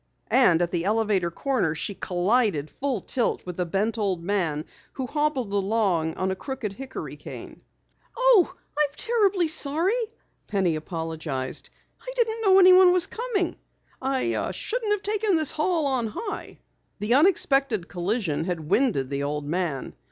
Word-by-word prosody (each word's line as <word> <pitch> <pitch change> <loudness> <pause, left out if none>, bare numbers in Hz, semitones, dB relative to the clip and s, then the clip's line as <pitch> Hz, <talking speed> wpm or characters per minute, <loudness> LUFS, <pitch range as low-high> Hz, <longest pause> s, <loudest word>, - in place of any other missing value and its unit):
And 180 -10 +5
at 175 - -2
the 170 -2 -1
elevator 205 -3 +1
corner 205 - -1
she 160 +6 -4
collided 185 - 0
full 265 -7 -2
tilt 245 +4 -1
with 180 0 -7
a 180 - 0
bent 210 +6 -1
old 190 -5 -1
man 170 -6 -1 0.3
who 265 - -4
hobbled 280 -6 -1
along 195 -6 +1
on 190 0 -1
a - - -2
crooked 250 -2 -5
hickory 265 +5 -7
cane. - - -10 0.6
"Oh, - - +5 0.2
I'm 300 -1 +2
terribly 405 -7 +2
sorry!" 320 +4 +1 0.5
Penny 190 -5 +1
apologized. 160 -4 -4 0.3
"I - - -7
didn't 455 -2 0
know 385 -3 +5
anyone 370 -1 +8
was 360 -1 +4
coming. 440 -7 -2 0.4
I 270 +5 0
shouldn't 450 -2 -2
have 415 -1 0
taken 420 -2 +1
this 315 -3 +2
hall 320 0 0
on 260 -4 0
high." 405 - -6 0.4
The 210 +3 0
unexpected 275 - +3
collision 175 -4 -2
had 170 -3 -4
winded 200 - +2
the 140 0 -1
old 145 +1 -2
man. 155 -3 -2
225 Hz, 150 wpm, -25 LUFS, -, 0.6 s, anyone